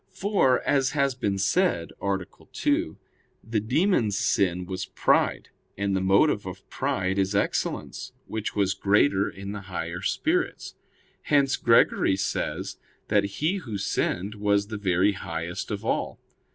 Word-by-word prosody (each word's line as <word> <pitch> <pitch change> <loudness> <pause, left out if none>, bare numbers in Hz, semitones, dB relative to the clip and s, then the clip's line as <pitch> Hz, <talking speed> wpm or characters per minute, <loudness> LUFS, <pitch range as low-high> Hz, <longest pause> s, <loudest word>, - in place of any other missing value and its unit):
For, 190 -10 +2
as 135 -2 +2
has 140 -1 +2
been 105 -6 -1
said 95 - +1
(A. 100 0 +1 0.4
2), - - 0 0.5
the 110 0 -1
demons' 115 - +1
sin 90 -3 +1
was 95 +1 -4
pride; - - +1 0.3
and 100 0 0
the 95 - 0
motive 100 +2 +3
of 95 +1 -9
pride 95 +1 -1
is 95 +1 0
excellence, 100 - -2
which 110 -1 -4
was 100 -2 +2
greater 100 +1 +2
in 100 +1 -7
the 105 -1 -6
higher 85 0 -4
spirits. 360 - -1 0.5
Hence 140 -2 +2
Gregory 115 -4 +4
says 100 - -3 0.3
that 105 -1 +3
he 150 - -1
who 120 - -5
sinned 100 0 -1
was 100 -1 +1
the 110 - -4
very 95 0 +2
highest 85 -2 -5
of - - -4
all. - - -1
100 Hz, 140 wpm, -26 LUFS, 95-125 Hz, 0.5 s, Gregory